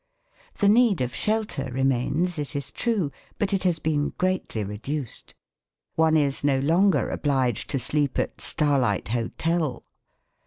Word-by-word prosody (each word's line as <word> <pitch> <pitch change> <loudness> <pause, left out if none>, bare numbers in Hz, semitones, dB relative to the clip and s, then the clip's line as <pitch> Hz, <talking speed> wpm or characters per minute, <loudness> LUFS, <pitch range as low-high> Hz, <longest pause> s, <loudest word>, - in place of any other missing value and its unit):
The 200 - +3
need 220 -2 +5
of 125 -1 -2
shelter 215 -10 -1
remains, 135 +7 0
it 145 0 -4
is 140 -1 -3
true, 210 -11 0 0.3
but 205 -2 0
it 195 - +1
has 180 -3 +1
been 150 -2 -1
greatly 185 - -1
reduced. 115 +7 -5 0.6
One 160 0 +3
is 140 -2 +1
no 140 -2 +3
longer 160 - +2
obliged 130 -6 0
to 140 - +1
sleep 140 +2 0
at - - -2
"starlight 135 - +1
hotel". 150 +6 -1
145 Hz, 140 wpm, -25 LUFS, 130-180 Hz, 0.6 s, need